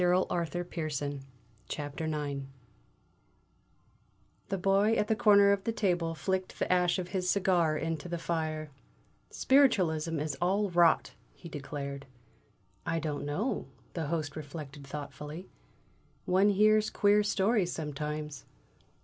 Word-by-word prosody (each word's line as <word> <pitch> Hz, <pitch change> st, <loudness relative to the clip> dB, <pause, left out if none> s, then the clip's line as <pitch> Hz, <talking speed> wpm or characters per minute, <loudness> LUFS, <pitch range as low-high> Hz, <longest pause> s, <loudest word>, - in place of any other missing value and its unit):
IX 175 Hz, -2 st, +2 dB
THE 175 Hz, 0 st, -3 dB
TRAGEDY 145 Hz, -4 st, -3 dB, 0.6 s
AT 145 Hz, -1 st, -5 dB
THE 160 Hz, -, -3 dB
"LOUP -, -, 0 dB
NOIR" 145 Hz, -2 st, -2 dB, 2.1 s
The 195 Hz, -, -1 dB
Boy 195 Hz, +4 st, +3 dB
at 210 Hz, -, +1 dB
the 220 Hz, -, +2 dB
corner 205 Hz, -3 st, +6 dB
of 200 Hz, -1 st, +1 dB
the 230 Hz, -, 0 dB
table 175 Hz, -7 st, 0 dB
flicked 190 Hz, +2 st, -2 dB
the -, -, +1 dB
ash 180 Hz, 0 st, +2 dB
of 180 Hz, -1 st, -4 dB
his 185 Hz, -2 st, -1 dB
cigar 180 Hz, -6 st, +2 dB
into 165 Hz, +1 st, -3 dB
the 170 Hz, -, -2 dB
fire. 155 Hz, -2 st, -3 dB, 0.6 s
"Spiritualism 175 Hz, -, +3 dB
is 150 Hz, -1 st, -2 dB
all 195 Hz, +3 st, +1 dB
rot!" 170 Hz, -2 st, +4 dB, 0.2 s
he 170 Hz, -, -11 dB
declared. 140 Hz, -2 st, -6 dB, 0.8 s
"I 165 Hz, -, -1 dB
don't 150 Hz, -3 st, -3 dB
know," 195 Hz, -, -2 dB, 0.3 s
the 165 Hz, -4 st, -3 dB
Host 155 Hz, -2 st, -2 dB
reflected 145 Hz, -2 st, -8 dB
thoughtfully. 150 Hz, +4 st, -7 dB, 0.8 s
"One 190 Hz, +3 st, +4 dB
hears 215 Hz, +1 st, +4 dB
queer 205 Hz, +1 st, +4 dB
stories 205 Hz, -2 st, +1 dB
sometimes." 150 Hz, -1 st, -4 dB
170 Hz, 130 wpm, -30 LUFS, 150-195 Hz, 2.1 s, corner